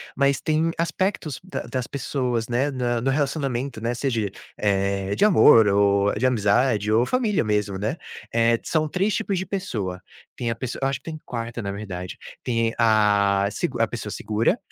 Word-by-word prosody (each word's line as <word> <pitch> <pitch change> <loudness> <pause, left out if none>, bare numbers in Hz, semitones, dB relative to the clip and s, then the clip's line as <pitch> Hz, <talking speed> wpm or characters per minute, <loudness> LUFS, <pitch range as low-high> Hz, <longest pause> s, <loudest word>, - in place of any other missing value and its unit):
mas 140 -1 +2
tem 160 +1 +1
aspectos 165 -4 -1
da 185 - -5
das 130 -2 -3
pessoas, 125 -4 -2
né, 130 +4 0
na 120 -3 -1
no 135 +3 +1
relacionamento, 135 -4 -1
né. 115 +1 -1
Seja, 115 -6 -1 0.3
eh, 100 -1 0
de - - +4
amor 150 - +7
ou 100 0 +3
de 120 - 0
amizade 105 -2 +2
ou 115 +3 +4
família 230 -6 +1
mesmo, 105 -2 0
né, 110 - -2 0.4
eh, 115 0 +3
são 155 -1 0
3 190 +6 0
tipos 205 -3 -1
de 185 - -2
pessoa. 110 - -4 0.4
Tem 120 - -2
a 115 - -1
pesso 125 +1 -5
eu 135 - +2
acho 135 - -2
que - - -39
tem 155 - -7
4 115 -1 -5
na 100 - -3
verdade, 90 -3 -6 0.2
tem 115 -2 0
a 100 -3 +3
segu 125 - -2
a 115 - +3
pessoa 110 -2 -6
segura, 110 - 0
120 Hz, 180 wpm, -24 LUFS, 105-140 Hz, 0.4 s, amor